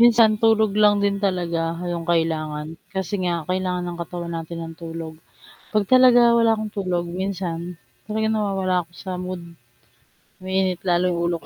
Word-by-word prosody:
Minsan 230 -2 +7
tulog 220 -2 +4
lang 210 0 +6
din 200 0 +2
talaga 170 -3 -1 0.3
'yong 170 -1 -4
kailangan, 155 -2 -1 0.3
kasi 190 +1 -2
nga 175 -1 +1 0.2
kailangan 180 -1 -1
ng 175 -1 -5
katawan 170 0 -6
natin 165 +1 -6
ng 165 - -8
tulog, 165 -1 -6 0.6
'pag 210 -1 +2
talaga 255 -1 +7 0.2
wala 230 -1 +4
akong 215 0 -4
tulog 180 -3 -1 0.2
minsan 190 -3 -2 0.5
talagang 220 +1 0
nawawala 195 -3 0
ako 170 - -17
sa 190 - -5
mood, 185 -1 -5 1.0
umiinit 185 -1 0
lalo 175 +1 +3
yung 170 -1 -1
ulo 170 0 0
ko. - - -16
185 Hz, 160 wpm, -23 LUFS, 170-205 Hz, 1.0 s, Minsan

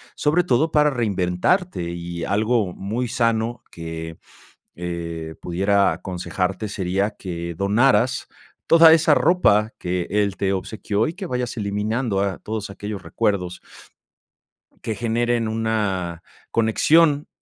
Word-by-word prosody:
sobre 155 +4 +2
todo 160 0 +2
para 150 -1 +4
reinventarte. 105 - 0
Y 85 0 -5
algo 110 -2 +1
muy 110 +7 -3
sano 115 -1 0
que, 80 -1 -7 0.6
eh, 85 -2 -5
pudiera 100 +2 +2
aconsejarte 90 +3 -3
sería 95 +1 -1
que 85 -4 -6
donaras 110 +6 +2 0.4
toda 165 -1 +8
esa 160 -1 +5
ropa 115 - +3
que 90 -1 -2
él 100 -1 +1
te 95 -1 0
obsequió 105 +2 -1
y 160 - -5
que 190 0 -6
vayas 125 -4 -3
eliminando 105 +1 -1
a 100 -2 -2
todos 110 -2 -5
aquellos 100 -1 -6
recuerdos 100 -6 -2 1.2
que 110 - -2
generen 120 +1 0
una 105 -6 -1 0.3
conexión 145 +7 +3
105 Hz, 115 wpm, -22 LUFS, 90-120 Hz, 1.2 s, toda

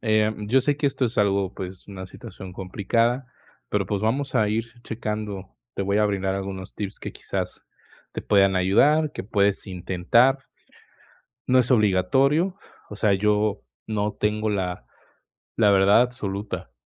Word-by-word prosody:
eh, 110 -1 +2
yo 130 +4 +3
sé 145 +1 0
que 145 - +1
esto 135 -1 0
es 115 - -2
algo, 100 -2 +2
pues, 95 -1 -8
una 95 -2 -7
situación 95 0 -10
complicada, 115 +7 0 0.4
pero, 105 -1 0
pues, 100 +1 -2
vamos 130 +6 -1
a 105 -1 +3
ir 115 +3 -3
checando. 105 -4 -5 0.2
Te - - -2
voy 100 +2 +1
a 105 - +4
brindar 95 -1 -1
algunos 95 -1 -6
tips 105 -1 -5
que - - -6
quizás - - -5 0.5
te - - -5
puedan 100 -2 +4
ayudar, 145 +12 +3
que - - -5
puedes 100 -1 +1
intentar 95 +8 +2 1.1
no 130 0 +4
es 125 -1 +2
obligatorio, 130 - +3 0.3
o 105 - -8
sea, 105 -1 +3
yo 105 +1 +1 0.2
no 105 -1 -1
tengo 105 +1 0
la 90 -10 -2 0.7
la 105 -3 +5
verdad 100 +2 +5
absoluta. 100 - -4
105 Hz, 155 wpm, -24 LUFS, 95-115 Hz, 1.1 s, la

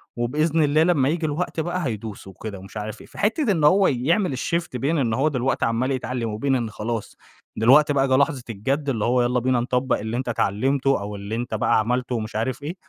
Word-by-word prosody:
وبإذن 150 +7 +1
الله 150 +2 +3
لما 155 -6 +3
ييجي 165 +1 -1
الوقت 160 +3 -2
بقى 175 +1 -2
هيدوس 110 -5 -5
وكده 100 0 -8
مش 95 +3 -10
عارف 105 +1 -6
إيه، - - -14
فحِتّة 225 +3 0
إن 165 -6 0
هو 190 +6 +5
يعمل 155 - +1
الشيفت 165 +2 -2
بين 140 +7 0
إن 120 -6 +1
هو 135 +6 +2
دلوقتي 135 -3 0
عَمّال 115 +4 0
يتعلّم 125 -3 -2
وبين 135 +5 0
إن 120 -3 -1
خلاص 105 +1 -4 0.4
دلوقتي 135 +7 +5
بقى 135 -1 +2
جَه 130 - +3
لحظة 140 -2 +1
الجَد، 135 +7 -2
اللي 115 -6 0
هو 125 +1 +3
يالّا 125 +1 +1
بينا 125 0 +1
نطبَّق 125 +2 0
اللي 110 +3 -3
أنت 130 -1 -3
اتعلّمته 130 +5 +1
أو 105 +1 -5
اللي 100 +2 -5
أنت 120 0 -4
بقى 110 - +2
عملته 125 +3 -1
ومش 110 -1 -4
عارف 125 +5 -2
إيه، 160 +5 -4
130 Hz, 215 wpm, -23 LUFS, 115-150 Hz, 0.4 s, هو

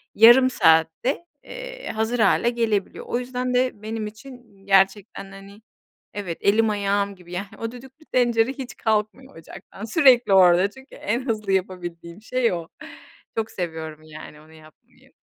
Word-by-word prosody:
yarım 240 +4 +7
saatte, 165 - +2 0.2
eee, - - -8
hazır 220 +2 -2
hâle 235 +1 +3
gelebiliyor. 225 -4 -2
O 240 - -1
yüzden 250 0 -3
de 250 -4 0
benim 220 0 -4
için, 225 -3 -14
gerçekten 195 0 +1
hani, 195 +2 -13 0.5
evet, 185 -5 -5
elim 220 +2 +3
ayağım 200 -1 -1
gibi 180 -1 -15
yani 195 +3 -4
o 230 0 -5
düdüklü 265 +5 -14
tencere 240 -1 +2
hiç 265 -3 -8
kalkmıyor 220 +3 -2
ocaktan. 165 +5 -11
Sürekli 245 - +4
orada 185 +1 +5
çünkü 265 +5 -16
en 235 +5 -3
hızlı 215 -4 -2
yapabildiğim 175 -1 -4
şey 245 0 0
o. 170 -2 -5 0.7
Çok 225 0 -2
seviyorum 160 -3 -6
yani 155 -1 -12
onu 155 +1 -19
yapmayı. 155 -1 -20
215 Hz, 145 wpm, -23 LUFS, 185-245 Hz, 0.7 s, yarım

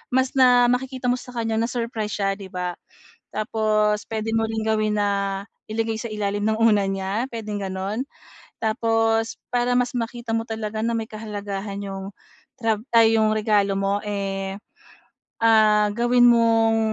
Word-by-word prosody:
mas 260 0 +2
na 245 -2 +5
makikita 255 0 -1
mo 250 - 0
sa 250 0 -12
kanya 225 -1 -1
na-surprise 230 -2 -2
siya, 200 -1 0
'di 195 - -8
ba? 180 -1 -3 0.6
Tapos, 215 -1 +1
puwede 220 0 -3
mo 225 0 +1
ring 220 0 -3
gawin 215 -1 +1
na 200 -1 0 0.2
ilagay 225 0 -2
sa 235 - -4
ilalim 205 -1 -2
ng 220 - +2
unan 215 -3 +3
niya, 195 +5 -2
puwedeng 215 -4 -5
gano'n. 195 +7 -3 0.5
Tapos, 225 0 +1
para 245 0 +1
mas 250 0 +1
makita 235 -1 -3
mo 225 - -1
talaga 220 -1 -4
na 235 - 0
may 225 -1 -3
kahalagahan 205 -2 -5
'yong 195 0 -6 0.5
trab 220 -2 0
ay 225 -1 +6
'yong 215 -1 +3
regalo 210 -2 +2
mo, 195 +1 0
eh, 195 -1 -3 0.8
ah, 215 -2 +5
gawin 240 +3 +3
mong, 225 -1 +4
220 Hz, 150 wpm, -23 LUFS, 205-230 Hz, 0.8 s, ay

